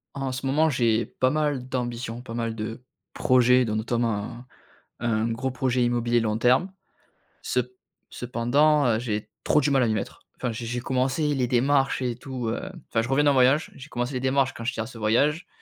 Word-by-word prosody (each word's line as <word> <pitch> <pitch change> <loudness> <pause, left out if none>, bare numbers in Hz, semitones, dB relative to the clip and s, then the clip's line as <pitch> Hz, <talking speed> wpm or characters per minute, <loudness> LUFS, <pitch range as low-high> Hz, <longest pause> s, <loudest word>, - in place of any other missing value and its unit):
En 135 -1 -2
ce 130 +1 -5
moment, 155 +4 +3
j'ai 115 -4 +2
pas 130 - 0
mal 145 -3 -1
d'ambitions, 120 -2 -3
pas 120 -2 -9
mal 115 -1 -2
de 115 +2 -6 0.3
projets 125 0 +4
dont 110 -1 -2
notamment 115 -1 0
un 120 +3 -9 0.6
un 115 -1 0
gros 130 +4 -2
projet 130 -1 0
immobilier 120 0 +1
long 110 -1 0
terme. 130 +11 +3 0.7
Cep 125 -1 0 0.5
cependant, 140 +5 +2
heu, 110 -2 +2
j'ai 110 -3 -3
trop - - +3
du 145 +1 +1
mal 135 -1 +3
à - - +2
m'y 110 - +1
mettre. 105 - -5 0.2
Enfin, 125 - -2
j'ai 115 +1 -6
j'ai 120 +1 -3
commencé 135 +4 0
les 125 -2 0
démarches 135 +3 +2
et 125 -2 -1
tout, 125 -1 -5
hem 185 +11 -4 0.2
enfin, 115 - +1
je 120 - -4
reviens 135 +2 +3
d'un 145 - +5
voyage, 135 +5 +3
j'ai 135 +2 -11
commencé 120 +1 -3
les 130 - -1
démarches 135 0 +1
quand 115 - -8
j'étais 120 -2 -2
à - - -3
ce 115 - -11
voyage, 140 - +1
125 Hz, 205 wpm, -25 LUFS, 115-135 Hz, 0.7 s, d'un